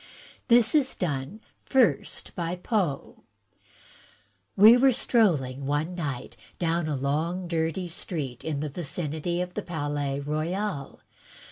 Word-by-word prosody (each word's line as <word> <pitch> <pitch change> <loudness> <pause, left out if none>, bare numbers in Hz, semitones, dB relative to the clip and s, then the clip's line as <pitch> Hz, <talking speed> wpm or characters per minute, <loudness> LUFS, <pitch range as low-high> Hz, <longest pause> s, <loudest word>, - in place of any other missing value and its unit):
This 235 -1 +5
is 285 -4 +3
done 155 +4 -3 0.2
first 230 - +1
by 170 0 -3
Poe: 180 - -2 1.3
We 215 +4 +9
were 260 +1 +5
strolling 140 - +1
one 150 +5 -1
night 145 -8 -5 0.2
down 170 -1 0
a 150 - -1
long 160 +7 -1
dirty 165 +2 -1
street, 150 -7 -4
in 150 -3 -2
the 155 - -3
vicinity 165 +2 -2
of 180 0 -4
the 210 - -3
Palais 145 -5 -3
Royal. 155 +2 -3
165 Hz, 120 wpm, -27 LUFS, 145-185 Hz, 1.3 s, We